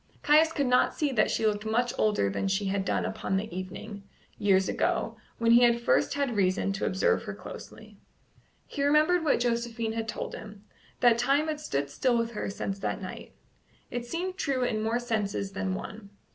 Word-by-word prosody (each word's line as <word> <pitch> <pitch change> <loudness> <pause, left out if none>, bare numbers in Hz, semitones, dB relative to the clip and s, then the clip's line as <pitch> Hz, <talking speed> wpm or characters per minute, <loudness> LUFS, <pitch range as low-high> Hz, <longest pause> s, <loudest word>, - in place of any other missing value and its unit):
Caius 310 +2 +5
could 285 -3 0
not 250 0 +3
see 295 -3 0
that 225 -5 +2
she 225 - 0
looked 210 -1 +1
much 235 +3 0
older 210 - +2
than 100 - -2
she 195 +1 0
had 195 0 0
done - - 0
upon 190 - -2
the 195 -3 -4
evening, 190 +3 -7 0.4
years 190 -2 +3
ago, - - 0 0.2
when 230 0 +2
he 235 +1 +7
had 235 -1 +5
first 235 - +2
had 280 -5 -1
reason 195 0 +1
to 195 - -2
observe 185 - +1
her - - -5
closely. - - -11 0.7
He 280 - -5
remembered 305 +5 +4
what 300 - +2
Josephine 235 -1 -1
had 225 0 -3
told 215 - -4
him 210 -1 -10 0.4
that 235 -1 +5
time 275 +5 +2
had 305 -1 -2
stood 140 - -2
still 245 - +1
with 230 0 -1
her 215 - -4
since 195 0 -4
that 195 - -2
night: 185 -2 -8 0.6
it 240 0 -4
seemed 365 +6 -3
true 270 -8 0
in 220 -3 0
more 225 +2 0
senses 215 -5 -2
than 190 -1 -2
one. 200 +1 -8
225 Hz, 195 wpm, -28 LUFS, 200-250 Hz, 0.7 s, he